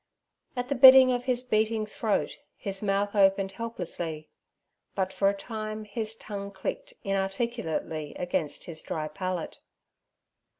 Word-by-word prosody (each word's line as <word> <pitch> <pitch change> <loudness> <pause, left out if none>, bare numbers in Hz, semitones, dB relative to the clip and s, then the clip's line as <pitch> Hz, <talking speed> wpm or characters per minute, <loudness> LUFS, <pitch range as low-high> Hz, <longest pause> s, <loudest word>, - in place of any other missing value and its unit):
At 245 0 -2
the - - +2
bidding 260 0 +9
of 245 0 -1
his 250 -1 0
beating 220 -2 +1
throat 215 0 -1 0.2
his 195 -1 -3
mouth 200 0 0
opened 195 -1 +4
helplessly, 175 -8 -5 0.7
but 190 -1 -1
for 195 - +3
a - - 0
time 215 0 -5
his 215 +1 -4
tongue 200 -2 -6
clicked - - -5
inarticulately 195 - -2
against 175 -4 -2
his 160 -2 -6
dry 155 -1 -3
palate. 180 +2 -4
200 Hz, 130 wpm, -28 LUFS, 190-230 Hz, 0.7 s, bidding